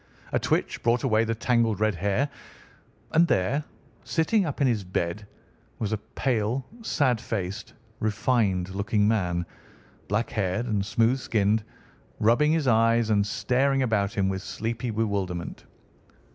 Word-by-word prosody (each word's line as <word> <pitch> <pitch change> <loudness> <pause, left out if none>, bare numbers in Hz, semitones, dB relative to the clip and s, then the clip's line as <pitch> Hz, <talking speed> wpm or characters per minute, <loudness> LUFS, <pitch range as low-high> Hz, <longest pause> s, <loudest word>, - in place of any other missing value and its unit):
A - - +3
twitch - - -1
brought 120 +1 +2
away 115 -4 +3
the 115 0 -1
tangled 115 -3 +1
red 110 0 +2
hair, 100 - 0 0.8
and 170 +2 +4
there, 125 - +1 0.4
sitting 185 +4 +1
up 145 - -4
in 140 - +3
his 115 -6 +1
bed, 90 +2 -3 0.5
was 105 -1 -2
a 110 - -1
pale, 120 +2 -1 0.2
sad 130 - +1
faced, 100 -2 -4 0.2
refined 105 -4 +1
looking 100 +2 +1
man, 90 -6 0 0.6
black 105 +4 -1
haired 105 +2 -1
and 105 -4 0
smooth 115 +5 +2
skinned, 105 -2 +1 0.6
rubbing 120 +8 +4
his 160 -4 +1
eyes 115 -1 +3
and 100 -1 +2
staring 130 +4 +1
about 105 -5 +1
him 100 -3 +1
with 95 0 -2
sleepy 115 +4 -4
bewilderment. 100 -6 -2
110 Hz, 140 wpm, -26 LUFS, 100-125 Hz, 0.8 s, and